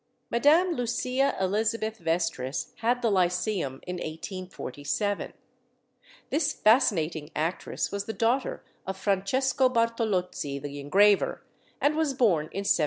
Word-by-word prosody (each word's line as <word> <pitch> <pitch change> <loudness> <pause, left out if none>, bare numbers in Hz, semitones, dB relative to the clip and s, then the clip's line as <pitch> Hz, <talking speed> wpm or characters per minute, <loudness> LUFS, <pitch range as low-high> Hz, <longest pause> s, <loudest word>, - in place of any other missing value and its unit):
Madame 310 +9 +4
Lucia 255 0 0
Elizabeth 220 +3 0
Vestris 165 -5 -2
had 245 +2 0
the 230 - +3
Lyceum 180 -6 0
in 180 0 -4
1847. 180 - -4 1.0
This 300 +1 +1
fascinating 165 - +2
actress 160 +4 -2
was 200 0 -3
the 220 - -3
daughter 235 +4 0 0.2
of 190 0 -3
Francesco 255 +7 +1
Bartolozzi, 220 - 0
the 145 0 -6
engraver, 195 +8 +3 0.4
and 295 +1 +2
was 310 -4 0
born 190 -12 +3
in 195 +5 -5
1797. - - +4
200 Hz, 115 wpm, -27 LUFS, 170-240 Hz, 1.0 s, Madame